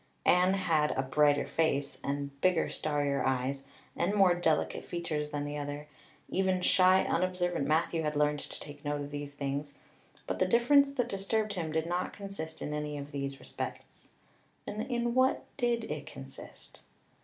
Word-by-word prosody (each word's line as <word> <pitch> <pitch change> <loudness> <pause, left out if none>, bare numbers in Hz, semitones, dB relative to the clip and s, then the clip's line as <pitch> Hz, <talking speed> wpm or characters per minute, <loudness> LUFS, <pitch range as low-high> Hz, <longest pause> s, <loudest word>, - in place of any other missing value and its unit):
Anne 180 +2 +5
had 160 -6 +2
a 130 - +2
brighter 145 +2 +3
face, 140 -4 0
and 140 0 -3
bigger, 180 -3 +3
starrier 145 -2 0
eyes, 135 +1 -1 0.3
and 190 +5 0
more 190 -3 +6
delicate 80 - +1
features 160 -4 -3
than 145 -1 -3
the 145 0 -4
other; 145 +1 -5 0.4
even 190 -1 +1
shy, 185 +1 +5
unobservant 175 -3 0
Matthew 160 +1 +2
had 150 -1 -1
learned 150 0 +2
to - - -7
take 145 -1 -10
note 145 0 -1
of 145 0 -6
these 145 0 -6
things; 140 0 -3 0.5
but - - -3
the 185 - +3
difference 275 +6 +5
that 245 -4 0
disturbed 210 +1 -1
him 165 -5 -3
did 160 +1 0
not 175 +2 -2
consist 195 -6 -7
in 150 - -3
any 150 0 -3
of 145 +1 -7
these 140 -1 -4
respects. - - -7 0.6
Then 210 - -4
in 240 -1 -1
what 260 +1 +3
did 240 -3 +1
it 150 -7 -5
consist? 135 -3 -11
155 Hz, 165 wpm, -31 LUFS, 145-185 Hz, 0.6 s, more